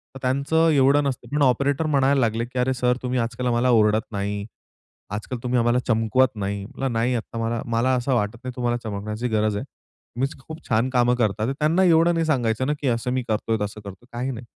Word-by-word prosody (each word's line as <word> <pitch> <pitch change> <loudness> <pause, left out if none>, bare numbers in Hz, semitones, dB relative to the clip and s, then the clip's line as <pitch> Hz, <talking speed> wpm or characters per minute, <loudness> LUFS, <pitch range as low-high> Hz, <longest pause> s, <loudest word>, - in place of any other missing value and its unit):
तर - - -7
त्यांचं 140 +5 +2
एवढं 140 0 +4
नसतं. 135 -2 -3
पण 150 - +1
ऑपरेटर 140 +4 +2
म्हणायला 140 -1 +3
लागले, 115 0 0
"की 125 +1 -5
अरे 130 +1 +2
सर 125 -1 +1
तुम्ही 125 0 -1
आजकाल 120 +2 -2
आम्हाला 120 +1 +2
ओरडत 110 -1 +3
नाही. 100 0 -3 0.7
आजकाल 105 +4 -4
तुम्ही 125 0 +1
आम्हाला 120 +1 +2
चमकवत 115 +3 +2
नाही." 100 -1 -3
म्हणला, 135 +6 -4
"नाही 125 +2 +1
आता 115 0 -5
मला, 115 0 -1
मला, 115 +3 +1
असं 125 +2 0
वाटत 105 0 -1
नाही 130 0 -5
तुम्हाला 120 -1 0
चमकण्याची 105 +2 -4
गरज 110 -1 +1
आहे. 125 - -4 0.5
तुम्ही 135 +2 +1
खूप 155 +4 -9
छान 115 +2 +2
कामं 125 -1 +3
करतात." 110 -2 0
त्यांना 160 +5 +3
एवढं 170 -1 +4
नाही 165 -1 0
सांगायचं 130 -4 0
ना, 150 - +1
की 140 - -1
असं 120 +1 0
मी 130 0 -1
करतोय, 110 +1 0
तसं 105 +1 -4
करतोय, 100 +2 -11
काही 125 +3 -2
नाही. 120 -1 -8
125 Hz, 210 wpm, -23 LUFS, 110-130 Hz, 0.7 s, एवढं